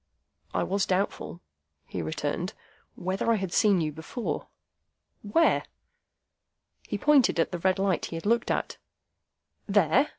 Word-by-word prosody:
"I - - 0
was 195 +1 0
doubtful," 185 -2 -1 0.4
he 90 - -5
returned, 80 -1 -3 0.4
"whether 190 +5 -1
I - - +4
had 190 -4 -3
seen 200 -5 +4
you 155 -1 -1
before." 160 - -4 0.7
"Where?" 215 +11 +3 1.2
He - - -2
pointed 290 -4 +4
to 165 - +3
the 175 - -6
red 185 +2 +2
light 195 -3 +1
he - - -6
had 165 - -6
looked 235 +2 +2
at. - - -1 0.9
"There?" 200 - +3
190 Hz, 135 wpm, -28 LUFS, 170-215 Hz, 1.2 s, I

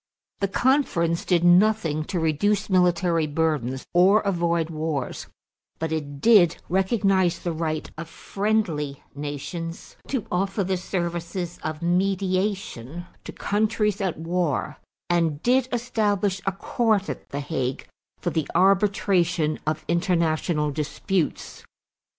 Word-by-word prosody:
The 200 - +1
conference 190 - +1
did 175 -2 +2
nothing 175 -4 +4
to 180 - -2
reduce 200 +7 +1
military 175 -3 +3
burdens 145 -5 -1
or 190 +5 +5
avoid 170 -4 0
wars 155 -4 -3 0.5
but 160 0 -3
it 145 -3 -4
did 200 -4 +5
recognize 190 -1 +2
the 175 - -3
right 155 -1 -2
of 170 -1 -6
friendly 175 -11 -2
nations 150 +4 -6
to 255 -6 -2
offer 195 +3 0
the 190 0 -1
services 175 -1 -3
of 155 +1 -4
mediation 185 - -1 0.2
to - - -6
countries 210 0 0
at 190 -4 -1
war 165 -2 -1 0.3
and 165 -4 +1
did 255 +1 +3
establish 210 -5 0
a - - +3
Court 210 +1 0
at - - -6
the 140 - -4
Hague 140 -3 -3 0.3
for - - -2
the 160 -3 -1
arbitration 180 -4 +2
of 155 0 -2
international 170 -3 +1
disputes. 155 +4 -2
175 Hz, 120 wpm, -24 LUFS, 160-195 Hz, 0.5 s, or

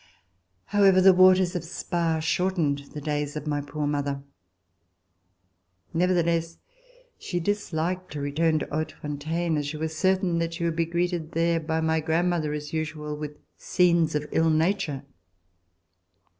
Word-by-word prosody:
However, 195 -2 +4
the 190 0 +7
waters 185 0 +5
of 175 - -2
Spa 170 -1 -1
shortened 165 -3 0 0.2
the 150 - -5
days 145 0 -2
of 150 - -5
my 145 -1 -1
poor 145 +1 -4
mother. 140 -1 -2 1.7
Nevertheless, 170 -1 +1 0.6
she 175 - -3
disliked 185 -1 -2
to 150 - -4
return 155 +3 +1
to - - -2
Hautefontaine, 155 +2 -3
as 145 -1 -2
she 155 +2 -4
was 160 +1 -3
certain 185 0 +1
that 165 0 -2
she 170 - -4
would 165 -1 0
be 165 0 +1
greeted 170 -1 -2
there 165 0 +2
by 160 0 -1
my 160 0 +1
grandmother, 160 0 0
as 150 0 -5
usual, 155 -1 -3
with 150 0 -7 0.2
scenes 170 -4 +2
of 150 0 -1
ill 160 0 +3
nature. 160 -3 0
160 Hz, 145 wpm, -26 LUFS, 150-175 Hz, 1.7 s, the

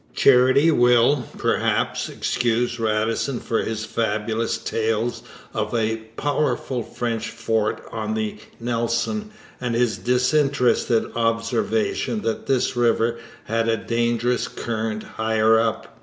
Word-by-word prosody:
Charity 135 +4 +5
will, 125 0 +4
perhaps, - - 0
excuse 120 0 0
Radisson 115 +4 0
for 115 - -1
his 110 0 -3
fabulous 110 0 -1
tales 115 +1 -1 0.3
of - - -2
a 110 -1 +1 0.2
powerful 145 -3 -1
French 115 -1 -3
fort 110 -2 -1
on 110 -1 -3
the 110 -1 -2 0.2
Nelson 120 - -1 0.3
and 120 -2 -1
his 115 -4 +1
disinterested 125 -2 +2
observation 115 - 0
that 115 - -3
this 130 -1 +1
river 115 -1 +2 0.2
had 115 0 0
a 115 - +2
dangerous 120 +2 0
current 110 -2 -3
higher 110 0 +2
up. 115 -1 -2
115 Hz, 110 wpm, -23 LUFS, 110-125 Hz, 0.3 s, Charity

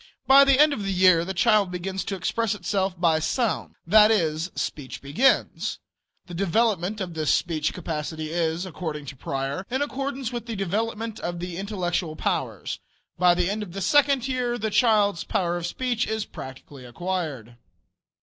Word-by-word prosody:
By 275 +1 +8
the 275 -1 +4
end 300 0 +6
of 215 - -4
the 195 -1 -2
year 180 -3 +5
the 190 +2 -4
child 200 +2 +3
begins 190 +2 -4
to 195 - -3
express 210 +5 -1
itself 190 -1 -2
by 165 -3 +3
sounds 225 +8 -1
that 210 +5 +6
is, 165 -5 +1
speech 140 -4 -4
begins. 155 - +1 0.5
The 175 - -10
development 200 +2 +1
of 185 -3 -4
this 155 -2 0
speech 155 -3 0
capacity 155 -2 -4
is, 165 +1 -1
according 160 -5 -5
to 140 - -8
Preyer, 135 +5 -3
in 260 +3 0
accordance 275 -3 -3
with 240 -1 -5
the 230 - -4
development 220 +3 -2
of 175 0 -4
the 175 0 -5
intellectual 180 -4 -2
powers. - - -2 0.4
By 180 -1 +5
the 175 0 +1
end 205 +3 -2
of 190 -5 -7
the 195 - -4
second 275 +3 +3
year 250 -2 -1
the 220 -1 -2
child's 205 -6 +3
power 175 -2 -1
of 175 -1 -3
speech 245 +3 -1
is 220 -1 -2
practically 130 0 -10
acquired. 135 -4 -4
185 Hz, 170 wpm, -25 LUFS, 165-220 Hz, 0.5 s, By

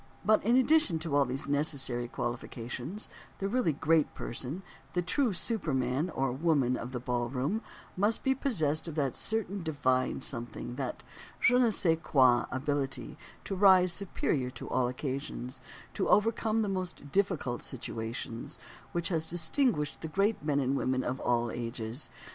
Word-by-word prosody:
But 215 0 +4
in 235 +4 +4
addition 260 - +4
to 155 -2 -2
all 140 -1 +5
these 135 +2 -3
necessary 140 -4 +1
qualifications 120 - -5 0.3
the 195 - -2
really 240 -5 +2
great 160 +1 +2
person—the 175 +7 -5
true 245 +7 +1
super 180 - 0
man 130 +6 0
or 135 -5 0
woman 135 -3 +2
of 125 +1 -5
the 125 - -3
ballroom—must 135 - -2
be 265 - +3
possessed 170 - 0
of 160 - -5
that 140 -5 0
certain 205 -3 -2
divine 130 -5 +1
something, 120 -1 -4
that 135 -3 -4 0.4
je 250 - +5
ne 250 -2 +5
sais 165 -6 +2
quoi 130 -6 +4
ability 135 0 -2 0.3
to - - -4
rise 185 -2 +6
superior 155 -8 -1
to - - -8
all 130 -1 +2
occasions, 130 0 -4 0.3
to 195 - -1
overcome 220 +1 +3
the - - -1
most 185 -7 -4
difficult 180 -10 0
situations, 115 +2 -5 0.4
which 170 +1 0
has 160 -3 0
distinguished 170 - +1
the 160 - -3
great 195 +4 +1
men 145 -2 +1
and 135 0 +1
women 130 -1 0
of 130 +2 -2
all 120 -1 +1
ages. 115 +2 -5
150 Hz, 150 wpm, -31 LUFS, 130-190 Hz, 0.4 s, rise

